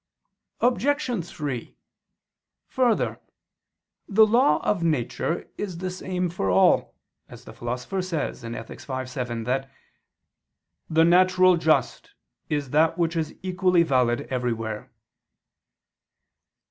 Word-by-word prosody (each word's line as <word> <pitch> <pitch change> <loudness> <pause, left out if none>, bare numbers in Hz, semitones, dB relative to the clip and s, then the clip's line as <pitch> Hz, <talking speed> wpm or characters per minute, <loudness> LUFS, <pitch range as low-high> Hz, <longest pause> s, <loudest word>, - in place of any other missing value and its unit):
Obj. 250 - +1
3: 140 -8 -5 0.9
Further, 245 -4 +1 0.9
the 220 +1 +6
law 215 - +4
of 200 -4 +1
nature 160 +1 -1
is 190 -5 -4
the 185 +1 -4
same 180 0 -3
for 95 - -2
all; 95 +1 +3 0.3
since - - -12
the - - -11
Philosopher 125 +10 -4
says 170 -9 -3
(Ethic. 115 -1 -7
v, 130 -1 -4
7) 125 -2 -4
that 135 +3 -2 1.2
"the 160 +1 +4
natural 185 +1 +5
just 160 -2 0 0.3
is 145 -4 -2
that 155 +3 +3
which 170 -1 0
is 160 -2 -2
equally 185 -2 +2
valid 125 -6 +2
everywhere." 115 -4 -3
165 Hz, 110 wpm, -25 LUFS, 125-185 Hz, 1.2 s, the